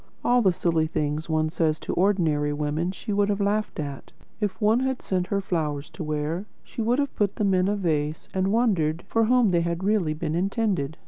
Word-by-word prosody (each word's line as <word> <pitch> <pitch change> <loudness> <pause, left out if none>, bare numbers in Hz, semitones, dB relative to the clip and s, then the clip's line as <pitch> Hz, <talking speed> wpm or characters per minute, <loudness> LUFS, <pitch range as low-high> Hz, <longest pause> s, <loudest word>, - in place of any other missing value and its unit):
All 245 0 +4
the 190 -4 +4
silly 165 -2 +1
things 150 +1 -2
one 155 0 +1
says 160 -2 0
to - - -3
ordinary 165 -6 +2
women 150 +4 -1
she 205 +2 -5
would 205 0 +2
have 205 0 0
laughed 205 -1 0
at. 140 -2 -6 0.3
If 210 -3 -2
one 215 +2 +3
had 265 0 -1
sent 180 -1 -1
her 200 0 0
flowers 155 -4 -2
to 160 - -6
wear, 155 +5 -2 0.2
she - - -6
would 235 +3 +2
have 280 -1 -1
put 205 -2 0
them 200 -2 +1
in 185 0 +3
a 205 - +1
vase 155 -5 -1
and 190 0 +1
wondered 180 -9 +1
for 225 +3 +2
whom 245 -3 +4
they 170 -1 +3
had 170 +1 -2
really 195 -7 +1
been 155 0 -3
intended. 185 - -1
180 Hz, 210 wpm, -25 LUFS, 155-205 Hz, 0.3 s, All